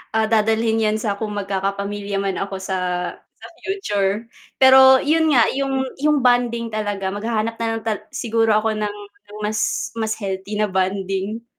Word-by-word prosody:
ah, 220 0 +3
dadalhin 225 0 +2
yan 215 0 +1
sa 205 -3 -1
kung 215 -2 -3
magkakapamilya 200 0 -3
man 195 -1 -2
ako 195 -1 -4
sa 190 0 -2 0.4
sa - - -18 0.2
future. 210 - -1 0.3
Pero 265 0 +8
yun 320 +1 +2
nga, 235 - +6
yung 270 -1 -1 0.2
yung 295 -2 +2
bonding 240 -2 +2
talaga 205 -3 -2
maghahanap 220 +2 -2
na 230 - -1
lang - - -7
tal 215 -2 -1
siguro 225 -2 +1
ako 215 +1 +1
ng 210 -1 -3 0.5
mas 210 0 -1
mas 220 0 -1
healthy 195 0 -5
na 210 -1 +1
bonding. 195 +3 -2
215 Hz, 155 wpm, -21 LUFS, 200-230 Hz, 0.5 s, Pero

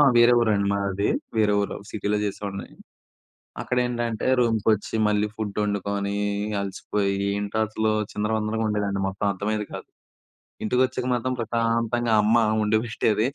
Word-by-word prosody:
వేరే 120 +1 +7
ఊరండి 105 -3 +2
మాది. 100 0 0 0.3
వేరే 105 -2 +3
ఊరు 100 - -3
సిటీ‌‌లో 105 0 -1
చేసేవాడిని. 100 -1 -4 1.0
అక్కడ 125 - -2
ఏంటంటే, 120 -2 -2
రూమ్‌‌కొచ్చి 110 -3 +1
మళ్ళీ 105 0 +2
ఫుడ్ 105 -2 -4
వండుకొని 100 0 -1 0.5
అలసిపోయి 100 0 -2 0.2
ఏంటో 100 +1 -3
అసలు 110 0 0 0.2
చిందరవందరగా 110 +1 -1
ఉండేదండి. 100 -2 -1
మొత్తం 95 +2 -3
అర్థమయ్యేది 105 +2 -2
కాదు. - - -8 0.7
ఇంటికొచ్చాక 125 +3 +1
మాత్రం 130 +1 -1
ప్రశాంతంగా 115 +1 0
అమ్మ 110 +3 +4 0.2
వండిపెట్టేది 110 0 +1
105 Hz, 115 wpm, -25 LUFS, 100-115 Hz, 1.0 s, వేరే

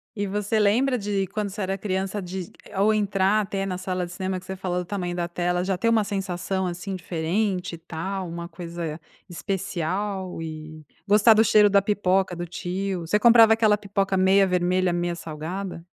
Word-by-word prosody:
E 205 -1 -2
você 210 +2 0
lembra 245 +6 +3
de 200 -2 -1
quando 210 +1 -3
você 205 +2 -6
era 195 +1 -1
criança, 195 +1 -2
de 180 0 -6 0.3
ou 210 +2 +4
entrar 205 0 +2
até 195 -1 -2
na 185 -2 -3
sala 185 -1 -2
de 175 - -11
cinema 185 0 -3
que - - -16
você 190 0 -6
falou 180 -1 -2
do 180 - -4
tamanho 175 -2 -3
da 175 -1 -1
tela, 180 +1 -1
já 190 -1 -1
ter 230 - 0
uma 225 -2 +4
sensação, 190 -1 -2
assim, 180 +2 -4
diferente 180 +2 -2
e - - -11
tal, 180 +3 -5
uma 170 +1 -6
coisa 170 -2 -6 0.3
especial 190 0 -3
e 155 -1 -8 0.2
gostar 210 +2 +6
do 220 +1 +5
cheiro 210 0 +6
da 200 0 +4
pipoca 190 -3 +1
do 175 0 -4
tio? 180 +1 -3
Você 210 - +3
comprava 230 -1 +7
aquela 215 -2 +3
pipoca 195 -1 -1
meia 190 +1 +5
vermelha, 180 0 +1
meia 175 0 -1
salgada? 170 +3 -6
190 Hz, 190 wpm, -24 LUFS, 175-205 Hz, 0.3 s, comprava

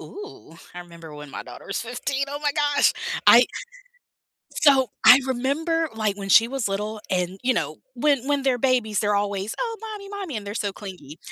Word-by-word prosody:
Ooh, 410 - -11 0.2
I 175 - -7
remember 170 -3 -12
when 150 -1 -10
my - - -6
daughter - - -12
was 195 - -3
15. 255 +4 -3
Oh 285 +1 -5
my 295 - +2
gosh! 290 -1 +2 0.3
I - - +8 1.1
So 270 -4 +4 0.2
I 255 +2 +9
remember, 305 +6 -1
like, 215 -2 -1
when 200 -1 -7
she 225 +4 +6
was 260 -4 -2
little 210 +2 -4
and, 185 0 -1
you 255 +1 +2
know, - - -2 0.2
when 280 -4 +1
when 285 -1 +1
they're 265 -2 +1
babies, 245 -5 +1
they're 210 -1 +1
always, 200 +1 -2
"Oh, 460 -2 -2
mommy, 425 -3 -8
mommy," 395 - -6
and 205 -1 -6
they're 205 - -5
so 205 -3 -2
clingy 185 -7 -10
245 Hz, 190 wpm, -23 LUFS, 200-285 Hz, 1.1 s, I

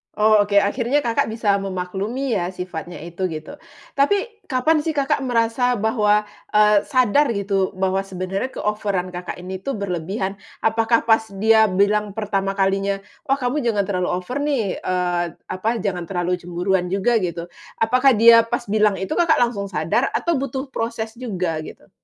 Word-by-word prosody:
Oh, 215 0 +4
oke. 200 - -2
Akhirnya 245 +7 0
Kakak 230 -1 +1
bisa 215 -3 +1
memaklumi 195 +7 -3
ya 175 -1 -1
sifatnya 180 -1 -6
itu, 175 +2 -3
gitu. 160 - -8 0.4
Tapi, 405 +10 +1
kapan 300 +4 +2
sih 315 +1 -2
Kakak 280 -1 +1
merasa 245 0 +1
bahwa, 210 -1 +2 0.3
eee, 210 -1 +5
sadar 255 +2 +3
gitu, 195 -2 -1
bahwa 190 0 0
sebenarnya 195 +5 -4
keoveran 200 -4 -2
Kakak 180 0 -5
ini 185 +1 -6
tuh 275 +8 -4
berlebihan? 190 +1 -3 0.3
Apakah 225 +1 +2
pas 225 -1 +3
dia 220 +1 +5
bilang 200 +2 +1
pertama 195 -2 -1
kalinya, 195 0 +1 0.3
"Wah, 275 0 +2
kamu 255 +2 -1
jangan 220 -4 +1
terlalu 180 -2 -1
over 185 +10 -3
nih," 260 -10 -1
eee, 180 -1 0 0.3
apa, 185 +4 -4 0.2
"jangan 180 -3 -1
terlalu 180 -1 -1
cemburuan 180 +1 -1
juga." 200 +5 +2
Gitu. 170 -2 -3 0.3
Apakah 255 +3 +3
dia 230 +1 +8
pas 240 +1 -3
bilang 210 -1 +2
itu 190 +1 -3
Kakak 335 -3 +3
langsung 225 -5 0
sadar 170 - 0
atau 340 - +1
butuh 265 0 -3
proses 225 -2 -3
juga 180 -9 -2
gitu? - - -12
210 Hz, 160 wpm, -21 LUFS, 185-240 Hz, 0.4 s, dia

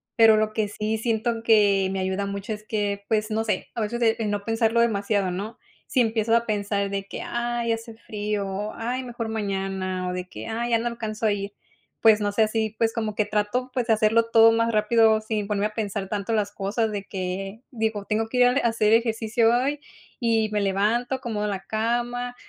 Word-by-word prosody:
Pero 225 -2 +7
lo 215 0 0
que 215 -1 0
sí 215 +2 -2
siento 225 0 -1
que 205 -4 +4
me 195 - -2
ayuda 190 +1 -1
mucho 200 +2 -4
es 210 - -8
que 205 -2 -2
pues 215 0 0
no 220 +1 0
sé, 220 - -2
a 230 - -3
veces 225 +3 -2
es 225 0 +2
el 215 - -1
no 205 -1 -2
pensarlo 225 0 +1
demasiado, 205 -4 +1
¿no?, 205 +5 -5 0.3
si 255 - +2
empiezas 225 -1 +2
a - - -14
pensar 205 -1 -1
de 195 0 -2
que, - - -7
ay, 240 -1 -2
hace 225 0 -4
frío, 210 -2 -3
o, 200 +2 -4
ay, 245 +3 -3
mejor 240 -2 -5
mañana 195 -3 -2
o - - -3
de 180 0 -4
que, - - -8
ay, 235 +2 -2
ya 230 - +4
no 240 - -2
alcanzo 225 -2 -4
a - - +3
ir. 200 0 -5 0.5
Pues 220 -1 +6
no 205 -1 0
sé 215 +1 +3
si 220 0 -1
pues 225 0 +1
como 220 -3 -2
que 210 - +1
trato 215 +5 -1
pues 250 -3 -1
de 225 - +5
hacerlo 220 +1 +3
todo 225 0 +7
más 230 0 +1
rápido, 220 0 +4
sin 215 -1 -2
ponerme 210 0 0
a 215 - -13
pensar 205 -3 -3
tanto 205 +2 -2
las 210 -2 0
cosas 210 +3 -1
de 205 -2 -4
que 195 +3 -5
digo, 220 -4 -2
tengo 220 +1 0
que 250 - -4
ir 250 - +6
al 250 +2 +3
a 240 - +2
hacer 220 -2 +2
ejercicio 225 0 +2
hoy 280 +4 0 0.4
y 225 -3 +2
me 210 - 0
levanto 220 +7 0
como 215 -3 -2
la 195 -2 -3
cama, 240 +3 -2
220 Hz, 220 wpm, -25 LUFS, 205-230 Hz, 0.5 s, Pero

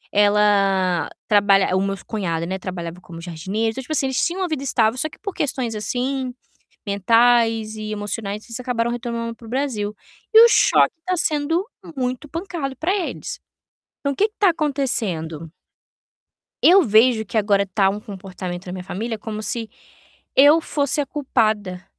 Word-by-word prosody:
Ela 195 -4 +3 0.2
trabalha 200 -2 +4
o 190 - +2
meu 195 0 -1
cunhado, 170 -6 -2
né, 190 +2 -4
trabalhava 180 -1 -6
como 165 -2 -11
jardineiro. 190 +7 -2
Então, 265 - -6
tipo 310 +5 -5
assim, 280 - +2
eles 265 -1 0
tinham 360 +2 -1
uma - - 0
vida 310 -4 -3
estável, 235 -4 +1
só 310 - 0
que - - -16
por 400 -3 -5
questões, 255 -5 -2
assim, 255 +4 -2 0.6
mentais 225 +2 +3
e 215 0 -5
emocionais, 205 0 -4
eles 230 +1 -4
acabaram 240 -2 -1
retornando 235 -1 -4
para 230 - -17
o - - -10
Brasil. 235 -6 -2 0.4
E 445 - +9
o - - +4
choque - - +4
tá 365 0 0
sendo 320 +3 +1 0.3
muito 255 +2 -3
pancado 330 -4 -5
pra 360 +8 -1
eles. 455 +6 -4 0.6
Então, 280 -1 -1
o - - -11
que 420 - +3
que 425 - -28
tá 400 -3 +5
acontecendo? 220 - -2 1.1
Eu 380 +3 +8
vejo 220 0 +4
que 220 - -3
agora 200 -1 +2
tá 195 +1 +2
um 205 +2 -3
comportamento 190 -3 -7
da 180 - -6
minha 185 -1 -6
família 220 +5 -4
como 215 -1 -5
se 225 -1 -2 0.7
eu 290 +4 +7
fosse 285 -2 0
a - - -2
culpada 215 -10 -1
225 Hz, 170 wpm, -21 LUFS, 195-270 Hz, 1.1 s, E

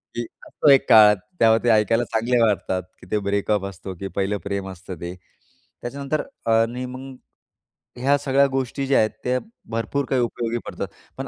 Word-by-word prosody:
की 120 - -2 0.2
असतो 150 - +1
एक 135 - +5
काळात 105 -2 +8 0.2
तेव्हा 115 0 +5
ते 120 - +2
ऐकायला 110 +2 +3
चांगले 120 +2 +2
वाटतात 95 -4 0 0.2
की - - -14
ते 105 - +2
ब्रेकअप 100 0 0
असतो, 95 0 -7
की 95 +3 -6
पहिलं 100 +1 0
प्रेम 100 -1 -3
असतं 95 0 -8
ते. 85 +1 -5 0.7
त्याच्यानंतर 140 +4 -3 0.3
आणि 115 +3 +1
मग 130 +1 -8 0.8
ह्या 140 +3 +3
सगळ्या 140 0 +3
गोष्टी 135 +1 -2
ज्या 135 - +4
आहेत 110 - +3
त्या 125 +1 +1 0.3
भरपूर 115 +5 -1
काही 130 -2 +2
उपयोगी 120 0 -2
पडतात. - - -5 0.3
पण - - -5
115 Hz, 170 wpm, -23 LUFS, 100-130 Hz, 0.8 s, काळात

